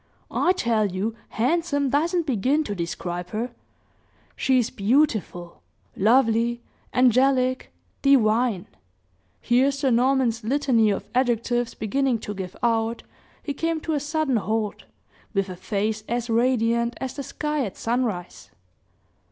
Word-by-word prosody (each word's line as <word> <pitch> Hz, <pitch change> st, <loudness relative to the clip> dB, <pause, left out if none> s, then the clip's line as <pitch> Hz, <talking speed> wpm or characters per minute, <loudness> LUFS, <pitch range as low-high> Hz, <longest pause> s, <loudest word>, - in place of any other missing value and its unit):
"I 360 Hz, -, +2 dB
tell 230 Hz, -, +1 dB
you 195 Hz, +4 st, -2 dB, 0.2 s
handsome 285 Hz, +2 st, 0 dB
doesn't 335 Hz, +4 st, +1 dB
begin 270 Hz, +4 st, +1 dB
to 210 Hz, -, -4 dB
describe 175 Hz, 0 st, -4 dB
her! 230 Hz, +3 st, -3 dB, 0.8 s
She 260 Hz, -1 st, +2 dB
is 240 Hz, -3 st, +1 dB
beautiful, 205 Hz, -, 0 dB, 0.3 s
lovely, 235 Hz, +2 st, +2 dB, 0.3 s
angelic, 255 Hz, +1 st, +2 dB, 0.3 s
divine 230 Hz, -6 st, +3 dB, 0.4 s
" -, -, -43 dB, 0.3 s
Here 250 Hz, +3 st, +3 dB
Sir 275 Hz, -1 st, 0 dB
Norman's 245 Hz, -1 st, +2 dB
litany 245 Hz, -3 st, +2 dB
of 200 Hz, -, -2 dB
adjectives 240 Hz, -1 st, 0 dB
beginning 260 Hz, +3 st, 0 dB
to 210 Hz, -, -5 dB
give 190 Hz, -2 st, -6 dB
out, 230 Hz, 0 st, 0 dB, 0.4 s
he 285 Hz, -, -3 dB
came 330 Hz, +3 st, -1 dB
to 320 Hz, -, -2 dB
a 295 Hz, -, +1 dB
sudden 295 Hz, -3 st, 0 dB
halt, 215 Hz, -1 st, -2 dB, 0.5 s
with 195 Hz, -1 st, 0 dB
a 185 Hz, -, -6 dB
face 215 Hz, +3 st, -2 dB
as 240 Hz, 0 st, -2 dB
radiant 235 Hz, 0 st, +2 dB
as 265 Hz, -1 st, -4 dB
the 285 Hz, -, -4 dB
sky 300 Hz, +2 st, -2 dB
at 200 Hz, -5 st, -6 dB
sunrise. 225 Hz, -7 st, -3 dB
240 Hz, 130 wpm, -24 LUFS, 215-270 Hz, 0.8 s, divine